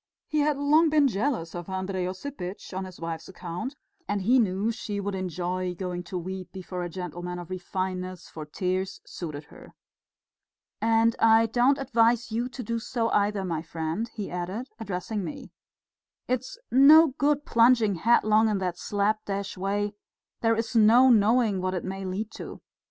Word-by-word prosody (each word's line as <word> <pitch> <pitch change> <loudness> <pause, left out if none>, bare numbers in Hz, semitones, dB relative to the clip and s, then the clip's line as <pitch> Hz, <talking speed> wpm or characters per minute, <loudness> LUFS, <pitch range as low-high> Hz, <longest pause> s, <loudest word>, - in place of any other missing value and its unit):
He 305 - -1
had 295 -1 +2
long 305 +3 +4
been 300 -2 +4
jealous 215 - -1
of 175 +1 -7
Andrey 190 -1 -2
Osipitch 185 -2 -6
on 190 +1 -3
his 185 -1 -11
wife's 165 +1 -5
account, 180 - -6 0.3
and 205 -2 -1
he 250 +6 +4
knew 205 0 +1
she 215 -3 -4
would 200 0 -3
enjoy 180 0 -3
going 180 -1 -4
to 180 - -5
weep 185 +1 -6
before 185 -1 -6
a 175 - -3
gentleman 180 0 -5
of 175 0 -8
refinement, 185 0 -3
for 155 - -9
tears 185 +4 -2
suited 155 -4 -6
her. - - -15 1.1
"And 225 0 +3
I 225 0 +6
don't 245 +5 +3
advise 235 -3 +2
you 235 +3 -1
to 250 0 -7
do 230 +1 -2
so 230 0 -1
either, 205 -1 +1
my 165 -3 -2
friend," 165 +7 -3
he 210 -3 -6
added, 185 +8 -4
addressing 205 0 -3
me. 280 +6 -7 0.8
"It's 255 - -2
no 300 +5 +8
good 290 0 +2
plunging 230 -3 +4
headlong 215 +2 +3
in 210 - +1
that 180 -2 -3
slap 210 +1 0
dash 200 0 -3
way; 205 +2 -1 0.5
there's 225 0 0
no 235 +4 +7
knowing 220 -2 +3
what 185 0 -1
it 180 - -3
may 190 +1 -5
lead 200 +4 -3
to. - - -8
200 Hz, 165 wpm, -27 LUFS, 185-230 Hz, 1.1 s, no